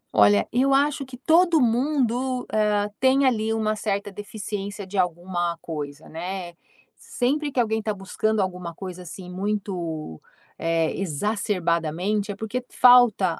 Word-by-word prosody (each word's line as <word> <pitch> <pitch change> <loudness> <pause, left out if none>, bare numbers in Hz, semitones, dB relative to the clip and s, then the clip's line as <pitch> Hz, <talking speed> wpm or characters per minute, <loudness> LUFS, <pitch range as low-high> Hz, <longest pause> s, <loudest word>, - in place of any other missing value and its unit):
Olha, 105 -1 +5
eu 270 +3 +3
acho 285 +1 +2
que 255 -1 -10
todo 330 +5 +4
mundo, 255 0 +1
hã, 210 -1 +2
tem 265 +1 +4
ali 225 -4 +1
uma 215 -1 0
certa 205 -1 -2
deficiência 205 0 -6
de 190 +2 -10
alguma 175 -1 -1
coisa, 150 -2 -6
né. 175 +2 -5 0.4
Sempre 290 +4 -1
que 260 - -1
alguém 220 -2 +1
está 220 0 -2
buscando 210 +3 -1
alguma 180 -3 -3
coisa, 185 -1 -7
assim, 180 +1 -9
muito, 180 - -4 0.4
eh, 165 -1 0
exacerbadamente, 190 +1 -1
é - - -6
porque 220 +5 -4
falta 240 -8 +5
205 Hz, 135 wpm, -24 LUFS, 175-240 Hz, 0.4 s, Olha